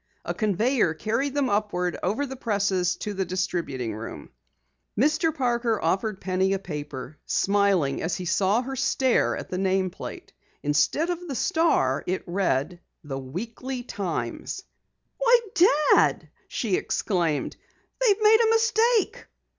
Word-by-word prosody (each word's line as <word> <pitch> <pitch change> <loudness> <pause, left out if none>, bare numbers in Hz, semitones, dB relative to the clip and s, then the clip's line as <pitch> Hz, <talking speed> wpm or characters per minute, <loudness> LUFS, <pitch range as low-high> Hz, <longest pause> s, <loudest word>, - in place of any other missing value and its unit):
A - - -2
conveyer 215 - +1
carried 235 - -1
them 285 -2 +2
upward 200 -5 0
over 220 +10 0
the 265 -1 -7
presses 200 -6 0
to 210 - -5
the 195 -1 -1
distributing 170 - -2
room. 110 +2 -8 0.7
Mr. 310 +5 +3
Parker 240 -5 0
offered 190 +4 -1
Penny 190 +1 0
a - - +1
paper, 150 -5 -7
smiling 195 -8 +2
as 165 - -1
he 180 - -5
saw 195 +6 +2
her 270 +1 -5
stare 265 -1 +2
at - - -8
the 185 - -2
nameplate. 190 -1 -2 0.3
Instead 150 - +2
of 355 0 -5
the 275 - -4
Star 235 - +2
it 185 +1 -1
read: 175 -3 -1 0.2
The 135 -3 -5
Weekly 230 - -5
Times. 185 - -4 0.6
"Why, - - +5 0.5
Dad!" - - +3 0.2
she 205 -6 -1
exclaimed. 170 -7 -1 0.5
"They've 430 -2 +3
made 435 +1 +7
a 445 - +3
mistake." 455 0 +2
200 Hz, 135 wpm, -25 LUFS, 175-270 Hz, 0.7 s, made